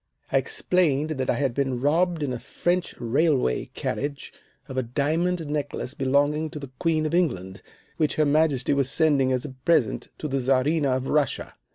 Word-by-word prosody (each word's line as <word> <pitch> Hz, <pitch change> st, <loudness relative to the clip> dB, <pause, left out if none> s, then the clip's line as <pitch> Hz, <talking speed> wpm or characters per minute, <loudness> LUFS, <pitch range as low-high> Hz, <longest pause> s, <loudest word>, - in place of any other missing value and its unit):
"I -, -, +4 dB
explained 180 Hz, -, +1 dB
that 130 Hz, -4 st, -2 dB
I -, -, +3 dB
had 135 Hz, -4 st, 0 dB
been 135 Hz, -2 st, -1 dB
robbed 165 Hz, +4 st, +1 dB
in 135 Hz, -3 st, -1 dB
a 125 Hz, -, -4 dB
French 175 Hz, +7 st, -1 dB
railway 130 Hz, -, +1 dB
carriage 140 Hz, 0 st, -4 dB, 0.3 s
of 135 Hz, -, -7 dB
a 130 Hz, -, +1 dB
diamond 160 Hz, +8 st, 0 dB
necklace 145 Hz, -3 st, -3 dB
belonging 145 Hz, +3 st, +1 dB
to 150 Hz, -, -8 dB
the 140 Hz, -3 st, -9 dB
Queen 160 Hz, -2 st, +1 dB
of 155 Hz, -, -2 dB
England, 95 Hz, -, 0 dB, 0.4 s
which 155 Hz, -2 st, +1 dB
her 155 Hz, -, +3 dB
Majesty 145 Hz, -3 st, +2 dB
was 140 Hz, -2 st, +1 dB
sending 140 Hz, -5 st, +3 dB
as 130 Hz, +1 st, 0 dB
a -, -, -5 dB
present 130 Hz, -3 st, 0 dB
to 155 Hz, -, -4 dB
the 135 Hz, -1 st, -1 dB
Czarina 135 Hz, +2 st, +2 dB
of 130 Hz, -, -5 dB
Russia. 145 Hz, 0 st, 0 dB
145 Hz, 180 wpm, -25 LUFS, 130-160 Hz, 0.4 s, I